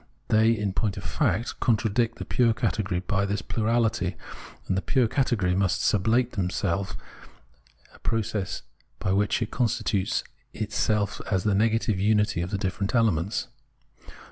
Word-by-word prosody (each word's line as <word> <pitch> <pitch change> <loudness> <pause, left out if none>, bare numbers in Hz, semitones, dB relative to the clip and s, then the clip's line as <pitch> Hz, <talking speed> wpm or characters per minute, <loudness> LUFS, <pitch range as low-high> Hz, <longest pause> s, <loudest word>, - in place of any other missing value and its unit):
They, 110 +1 +5
in 105 -2 -1
point 105 -1 -1
of - - -6
fact, 110 +8 -1
contra 115 -2 +2
dict 115 +2 0
the - - -6
pure 115 -2 +2
category 95 -6 -1
by 95 +1 0
this 100 +1 -2
plurality, 110 -5 0 0.5
and 95 - +1
the 95 - 0
pure 130 0 +2
category 110 -7 +1
must 95 -3 +1
sublate 110 +6 +2
them 95 -3 -1
in - - -1
itself, 95 0 -2 1.0
a - - -18
process 105 -6 -2 0.3
by 95 - -1
which 105 +4 +1
it 110 - -6
constitutes 110 -3 0 0.3
itself 105 -1 0
the 100 +1 +2
negative 110 0 +2
unity 105 -2 +2
of 85 - -3
the 100 - -1
different 100 +2 -2
elements. 105 -2 +1
105 Hz, 150 wpm, -26 LUFS, 95-115 Hz, 1.0 s, They